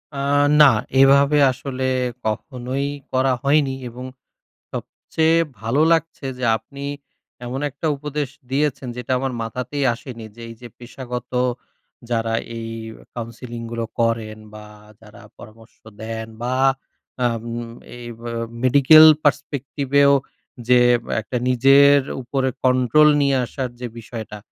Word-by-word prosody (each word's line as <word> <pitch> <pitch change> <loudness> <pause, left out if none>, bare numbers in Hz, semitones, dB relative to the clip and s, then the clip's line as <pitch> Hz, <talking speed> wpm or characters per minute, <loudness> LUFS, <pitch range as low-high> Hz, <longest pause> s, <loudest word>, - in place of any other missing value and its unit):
আ - - -4 0.4
না। - - +10 0.3
এভাবে 140 +2 +5
আসলে 130 0 -6 0.4
কখনোই 125 +5 -3 0.2
করা 130 0 +2
হয়নি 140 -1 +2
এবং 125 +2 -9 0.7
সবচেয়ে 160 +1 -1 0.2
ভালো 115 +7 0
লাগছে 165 -3 0
যে, 130 - -7
আপনি 140 +5 -11 0.6
এমন 125 +2 -4
একটা 145 +4 -4
উপদেশ 145 -1 -4 0.2
দিয়েছেন, 140 -1 -1
যেটা 125 +1 -5
আমার 135 0 -2
মাথাতেই 125 +5 -4
আসেনি। 115 -2 -9
যে 120 - -12
এই 115 - -10
যে, 120 - -8
পেশাগত 125 0 -8 0.8
যারা, 115 -1 -1 0.2
এই 115 0 -6 0.5
counselling 115 0 -7
গুলো 115 -1 -3
করেন, 115 -2 0 0.2
বা 105 0 -10 0.4
যারা 110 +2 -15 0.2
পরামর্শ 110 +1 -15 0.2
দেন, 110 0 -5
বা 125 +1 -1 0.7
আম 115 -2 -1 0.5
এই 120 - -10 0.2
আ - - -5 0.3
Medical 140 +5 +7 0.2
Perspective 140 -2 -2
এও 140 0 +6 0.5
যে, 125 0 +6 0.4
একটা 110 +4 -4
নিজের 135 +3 +6 0.2
উপরে 130 +1 -1 0.2
control 130 +4 +4
নিয়ে 140 -1 +2
আসার 130 +1 -4
যে 125 - -4
বিষয়টা, 110 -1 -8
125 Hz, 120 wpm, -21 LUFS, 115-140 Hz, 0.8 s, না